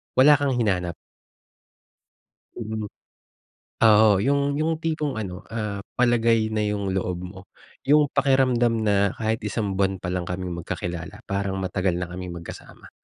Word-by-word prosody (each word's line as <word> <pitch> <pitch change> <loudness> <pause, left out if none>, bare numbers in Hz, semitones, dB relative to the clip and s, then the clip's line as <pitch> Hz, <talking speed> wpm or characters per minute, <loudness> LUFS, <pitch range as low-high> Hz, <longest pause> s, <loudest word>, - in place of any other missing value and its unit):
wala 135 +3 +7
kang 140 -3 0
hinanap. 90 -7 0 1.6
Mm. 110 -2 -4 1.0
Oo, 110 -1 +6
yung 140 +1 +1
yung 160 +1 0
tipong 155 -7 -2
ano, 95 -2 -6
ah, 105 -3 -4 0.2
palagay 115 -2 +3
na 110 -1 -1
yung 100 -2 -1
loob 90 -1 -2
mo, 90 +1 -8 0.4
yung 145 +1 +4
pakiramdam 130 -4 +2
na 100 -2 +2
kahit 110 0 -1
isang 105 -2 -2
buwan 95 -1 0
pa 90 - -5
lang 90 -1 -2
kaming 90 0 -4
magkakilala 85 +3 -5
parang 100 -1 -2
matagal 95 0 0
na 90 - -3
kaming 90 0 -6
magkasama. 85 - -11
105 Hz, 140 wpm, -24 LUFS, 95-120 Hz, 1.6 s, wala